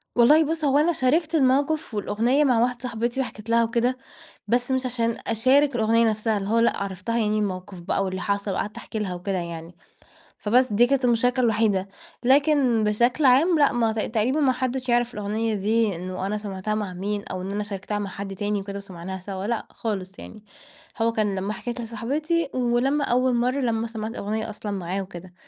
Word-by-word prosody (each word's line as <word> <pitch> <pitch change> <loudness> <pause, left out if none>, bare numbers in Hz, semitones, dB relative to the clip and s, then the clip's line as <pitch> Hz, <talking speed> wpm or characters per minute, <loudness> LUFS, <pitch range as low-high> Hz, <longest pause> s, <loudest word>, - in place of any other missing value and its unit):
والله 295 +7 +6
بُص 315 0 -2
هو 275 0 +3
أنا 320 +3 +3
شاركت 315 +5 +1
الموقف 280 0 +2
والأغنية 230 +7 +1
مع 250 -5 +3
واحدة 245 0 +1
صاحبتي، 240 +1 -2
وحكيت 220 -3 -7
لها 230 0 +4
وكده، 235 +2 0 0.5
بس 245 +2 +1
مش 260 0 0
عشان 235 -2 -1
أشارك 260 +5 +3
الأغنية 230 0 +3
نفسها 215 0 0
اللي 195 0 -4
هو 230 +1 +3
لأ، 235 - +2
عرّفتها 195 +4 -3
يعني 215 -2 +1
الموقف 185 -2 -4
بقى، 195 +3 -1
واللي 185 -1 -3
حصل 200 +1 -1
وقعدت 205 +2 -3
أحكي 220 - -5
لها 195 -4 -2
وكده 185 +2 -3
يعني، 170 0 -6 0.6
فبس 245 +2 +2
دي 240 +4 +5
كانت 270 -1 +1
المشاركة 245 +2 +2
الوحيدة. 215 -4 +2 0.4
لكن 265 -3 +3
بشكل 240 +7 +2
عام 300 +6 +5
لأ، 285 - +5
ما 235 -3 +1
تق 220 - -1
تقريبًا 235 +6 0
ما 275 -3 +4
حدش 255 0 -3
يعرف 240 0 +2
الأغنية 215 +2 -2
دي 210 0 +1
إنه 185 +2 -5
أنا 210 +2 -1
سَمعتها 205 0 -3
مع 205 -4 -3
مين، 200 +3 -3
أو 185 - -4
إن 190 +2 -5
أنا 210 +1 -2
شاركتها 205 0 -4
مع 200 -1 -3
حد 195 0 -6
تاني 205 +1 -1
وكده 200 0 -6
وسمعناها 190 -1 -7
سوا 190 +1 -6
لأ، 235 -1 -2
خالص 195 -4 -5
يعني. 215 -1 -11 0.6
هو 230 0 +3
كان 215 -3 0
لمّا 195 +2 -2
حكيت 240 +2 -5
لصاحبتي، 285 +8 -1
ولمّا 255 +4 +1
أول 250 +1 +2
مرة 250 +3 +1
لما 230 -2 0
سَمعت 220 -1 -5
الأغنية 220 +1 -3
أصلًا 210 -1 -6
معاه 190 0 -3
وكده. 185 -1 -10
225 Hz, 195 wpm, -24 LUFS, 200-250 Hz, 0.6 s, والله